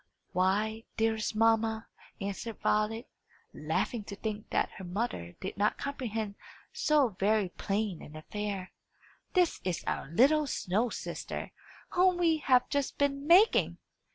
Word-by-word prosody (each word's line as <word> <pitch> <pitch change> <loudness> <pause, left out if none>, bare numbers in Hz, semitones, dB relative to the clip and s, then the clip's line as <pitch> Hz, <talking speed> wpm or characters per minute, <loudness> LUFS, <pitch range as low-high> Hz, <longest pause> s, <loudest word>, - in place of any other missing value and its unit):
"Why, 210 +5 +1
dearest 220 -1 0
mamma," 225 0 +2 0.3
answered 200 +3 -4
Violet, 220 +4 +1 0.5
laughing 235 -4 -1
to 200 - -6
think 215 +1 -5
that - - +1
her 190 - -8
mother 180 - -3
did 190 - -5
not 210 +1 +2
comprehend 225 -7 -3 0.4
so 295 -5 +3
very 205 -1 +2
plain 200 -1 -2
an 150 - -11
affair, 195 +3 -4 0.6
"this 360 -2 +3
is 180 -2 -2
our - - -2
little 285 - +4
snow 220 +1 0
sister, - - -5 0.4
whom 365 0 +3
we 330 -2 +3
have 255 -4 +3
just 285 -1 -1
been 280 0 0
making!" 375 +7 +5
220 Hz, 130 wpm, -31 LUFS, 200-275 Hz, 0.6 s, making